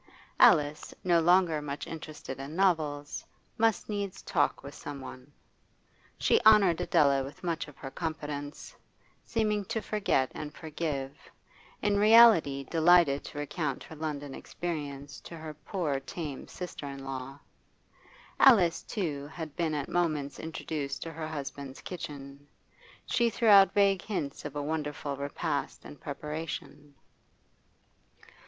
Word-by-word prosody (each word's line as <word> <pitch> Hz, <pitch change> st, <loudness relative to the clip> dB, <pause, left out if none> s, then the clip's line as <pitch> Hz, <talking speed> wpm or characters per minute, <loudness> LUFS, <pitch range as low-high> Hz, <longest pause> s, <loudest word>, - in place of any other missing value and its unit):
Alice, 150 Hz, 0 st, +4 dB
no 175 Hz, -2 st, +4 dB
longer 170 Hz, -2 st, +4 dB
much 145 Hz, 0 st, -5 dB
interested 155 Hz, -4 st, -7 dB
in 140 Hz, +3 st, -7 dB
novels, 155 Hz, -6 st, 0 dB, 0.4 s
must 225 Hz, -1 st, +2 dB
needs 200 Hz, -3 st, -4 dB
talk -, -, 0 dB
with 140 Hz, 0 st, -8 dB
some 145 Hz, -1 st, -7 dB
one; 130 Hz, +1 st, -10 dB, 0.9 s
she 455 Hz, -, +3 dB
honoured 200 Hz, -6 st, +6 dB
Adela 140 Hz, -2 st, +3 dB
with 140 Hz, +6 st, -10 dB
much 170 Hz, -2 st, -2 dB
of 145 Hz, -, -14 dB
her 135 Hz, -, -7 dB
confidence, 150 Hz, -2 st, -5 dB, 0.5 s
seeming 210 Hz, -3 st, 0 dB
to 220 Hz, -, -2 dB
forget 205 Hz, -12 st, 0 dB
and 150 Hz, 0 st, -7 dB
forgive, 150 Hz, -4 st, -4 dB, 0.7 s
in 205 Hz, -1 st, +2 dB
reality 210 Hz, -11 st, +7 dB
delighted 165 Hz, -1 st, +4 dB
to -, -, -9 dB
recount 145 Hz, -1 st, -3 dB
her 160 Hz, -, -11 dB
London 145 Hz, -3 st, -4 dB
experiences 145 Hz, -5 st, -5 dB
to 170 Hz, -, -10 dB
her 155 Hz, -1 st, -7 dB
poor 155 Hz, -2 st, -2 dB
tame 140 Hz, +1 st, -6 dB
sister 180 Hz, -5 st, -7 dB
in 135 Hz, -1 st, -7 dB
law. 135 Hz, 0 st, -6 dB, 1.0 s
Alice, 195 Hz, -11 st, +6 dB
too, 150 Hz, -9 st, -3 dB
had 160 Hz, -1 st, -7 dB
been 165 Hz, -3 st, 0 dB
at 145 Hz, -2 st, -2 dB
moments 155 Hz, -5 st, -1 dB
introduced 150 Hz, -3 st, -4 dB
to 165 Hz, -, -7 dB
her 160 Hz, 0 st, -5 dB
husband's 140 Hz, -3 st, -6 dB
kitchen; 145 Hz, -5 st, -8 dB, 0.6 s
she 235 Hz, -1 st, +2 dB
threw 230 Hz, 0 st, +1 dB
out 195 Hz, -2 st, +8 dB
vague 200 Hz, -2 st, +4 dB
hints 155 Hz, -10 st, -4 dB
of 145 Hz, -, -6 dB
a 145 Hz, -, -2 dB
wonderful 150 Hz, -2 st, -3 dB
repast 140 Hz, -, -3 dB
in 75 Hz, +1 st, -9 dB
preparation. 150 Hz, -, -6 dB
150 Hz, 135 wpm, -30 LUFS, 140-175 Hz, 1.0 s, out